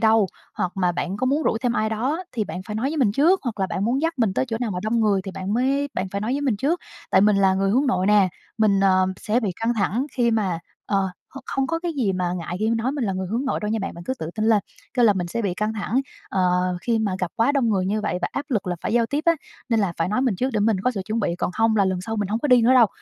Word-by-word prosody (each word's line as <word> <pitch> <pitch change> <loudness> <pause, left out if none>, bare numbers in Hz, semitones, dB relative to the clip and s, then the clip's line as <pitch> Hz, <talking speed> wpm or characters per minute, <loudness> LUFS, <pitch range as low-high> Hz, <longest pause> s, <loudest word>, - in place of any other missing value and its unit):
đâu, 220 -2 +4 0.3
hoặc 180 - -2
mà 180 -2 +1
bạn 180 +3 -3
có 255 - -1
muốn 290 +4 +1
rủ - - +1
thêm 245 -2 +1
ai 220 -2 0
đó 265 +11 -1
thì 220 -3 -1
bạn 185 - -6
phải 210 - -5
nói 255 +5 0
với 320 - -3
mình 230 -8 +3
trước, 330 - +4
hoặc 225 -6 -4
là 190 - +2
bạn 195 - -2
muốn 250 +4 +1
dắt 330 0 +1
mình 220 -6 +1
tới - - +1
chỗ 225 - -2
nào 235 -4 -1
mà 180 - -3
đông 225 +2 +1
người 205 -3 +3
thì 195 - -6
bạn 190 +3 -3
mới 275 +3 +1
bạn 185 +1 -2
phải 200 +1 -4
nói 225 +4 -1
với 280 - -1
mình 260 -7 +1
trước. 310 - 0 0.3
Tại - - +5
mình 210 0 +4
là 195 -1 +4
người 195 0 +1
hướng 265 +6 +2
nội 185 -7 +1
nè, 205 -3 +5 0.3
mình, 205 -3 +3
ờ, 185 -1 +4
sẽ 225 +6 0
bị 210 - -1
căng 235 +1 +1
thẳng 220 +6 0
khi 240 -2 +2
mà" 200 -7 0 0.3
ờ, 195 -2 +1 0.2
h - - -6
không 270 0 -1
có 330 +2 -1
cái 340 -1 -3
gì 235 -10 0
mà 180 -1 -1
ngại 175 0 -4
khi 220 +2 +1
nói 230 +4 0
mình 280 -5 -2
là 195 - 0
người 185 0 -3
hướng 235 +5 -1
nội 260 - -1
đâu 210 0 -2
nha 225 - 0
bạn, 195 - -4
bạn 170 0 -10
cứ 260 - -2
tự 160 - -4
tin 215 - -1
lên. 215 -3 +4 0.3
Kêu 245 -2 +4
là 210 - +6
"Mình 180 -2 -2
sẽ 230 +6 -2
bị 185 -3 -1
căng 215 +3 -1
thẳng, 220 +4 0 0.3
ờ, 195 - -3 0.4
khi 230 +2 0
mà 205 -4 0
gặp 180 -3 -2
quá 230 +5 +3
đông 270 -5 +2
người 190 -3 +1
như 210 +3 0
vậy 180 -4 -1
và - - +1
áp 280 - -3
lực 215 -7 -1
là 180 -1 -1
phải - - -2
giao 235 -1 +3
tiếp 295 +5 -2
á 335 - +7 0.4
nên 230 -2 +2
là 195 -4 0
phải 165 +1 0
nói 215 +6 0
mình 245 -7 +1
trước 255 +7 0
để 215 - 0
mình 210 -2 +2
có 250 +6 +1
sự 200 -6 -4
chuẩn 220 +2 -2
bị, 170 -4 0
còn - - -1
không 225 +2 +2
là 200 - +4
lần 185 -1 0
sau 225 +4 -4
mình 205 -2 -1
hông 220 +3 0
có 295 - -2
đi 250 -2 +6
nữa 245 - +5
đâu." 240 -3 +7
220 Hz, 320 wpm, -23 LUFS, 195-250 Hz, 0.4 s, á